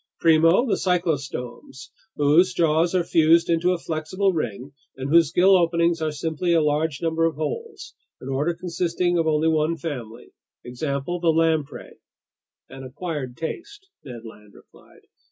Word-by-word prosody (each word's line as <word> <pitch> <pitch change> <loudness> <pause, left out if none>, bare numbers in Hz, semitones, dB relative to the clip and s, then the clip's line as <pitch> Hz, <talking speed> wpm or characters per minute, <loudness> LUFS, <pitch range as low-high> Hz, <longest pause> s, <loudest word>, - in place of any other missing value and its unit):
"Primo, 165 +7 +4
the 230 - 0
cyclostomes, 140 -6 -3 0.2
whose 165 +6 +3
jaws 165 +1 +1
are 180 - +2
fused 165 0 +3
into 170 +2 +2
a 180 - 0
flexible 170 +5 -2
ring 125 -3 -4 0.3
and 135 +1 -5
whose 165 -2 +4
gill 190 +2 +5
openings 170 -1 +1
are 155 -1 -1
simply 160 +3 -2
a 165 - +4
large 150 0 -1
number 165 0 +1
of 165 - -1
holes, 405 - -6 0.3
an - - -10
order 145 +6 -1
consisting 175 0 -1
of 165 - 0
only 155 0 +1
one 160 +1 +1
family. 125 -9 -8 0.3
Example: 140 +6 -4
the 170 -1 +1
lamprey." 160 -3 -1 0.7
"An 135 0 -11
acquired 135 -2 -6
taste," 385 - -7
Ned 120 -4 -10
Land 105 -2 -14
replied. - - -20
160 Hz, 150 wpm, -23 LUFS, 145-175 Hz, 0.7 s, gill